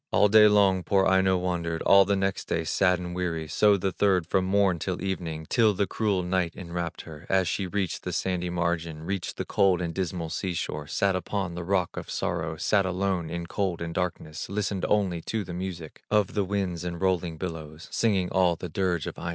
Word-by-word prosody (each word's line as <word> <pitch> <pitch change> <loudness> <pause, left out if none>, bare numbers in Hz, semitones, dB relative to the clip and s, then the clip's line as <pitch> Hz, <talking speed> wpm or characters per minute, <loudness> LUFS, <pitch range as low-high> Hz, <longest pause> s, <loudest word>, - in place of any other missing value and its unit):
All 105 +1 +4
day 105 +1 +8
long 100 -3 +4
poor 95 0 +2
Aino 95 0 +3
wandered, 85 -2 -2
All 100 0 +7
the 100 +1 +1
next 95 0 -1
day, 85 - 0
sad 90 +3 +2
and 90 0 -6
weary, 85 -3 -2
So 100 +6 +4
the 95 0 -1
third 95 -3 +2
from 95 +2 +1
morn 95 -2 +2
till 90 +2 -3
evening, 85 -5 -4
Till 110 -4 +3
the 100 - +1
cruel 100 -3 0
night 90 -1 -1
enwrapped 85 -2 -5
her, 75 -3 -11
As 95 -2 +2
she 95 +2 -1
reached 95 -1 -2
the - - -4
sandy 90 -1 -1
margin, 85 -2 -2
Reached 95 0 -4
the - - -3
cold 95 -3 +3
and 85 -2 -3
dismal 85 -3 -3
sea 95 -3 -2
shore, 75 -2 -4
Sat 100 +4 +1
upon 95 -1 -2
the 85 0 -5
rock 90 -1 0
of - - -6
sorrow, - - -2
Sat 100 -2 +2
alone 95 -2 -1
in 85 0 -4
cold 95 -1 -2
and 85 -1 -4
darkness, 85 -3 -3
Listened 100 -1 -1
only 95 -5 +1
to 110 +5 -3
the 90 - -8
music 85 -3 -6
Of 105 -3 +2
the 100 -2 0
winds 95 -3 -2
and 85 -1 -4
rolling 90 -3 0
billows, 80 -2 -7
Singing 95 -6 +1
all 90 -2 +3
the 90 +1 -7
dirge 90 -1 -1
of - - -6
Aino. 85 - -4
90 Hz, 210 wpm, -27 LUFS, 85-95 Hz, -, day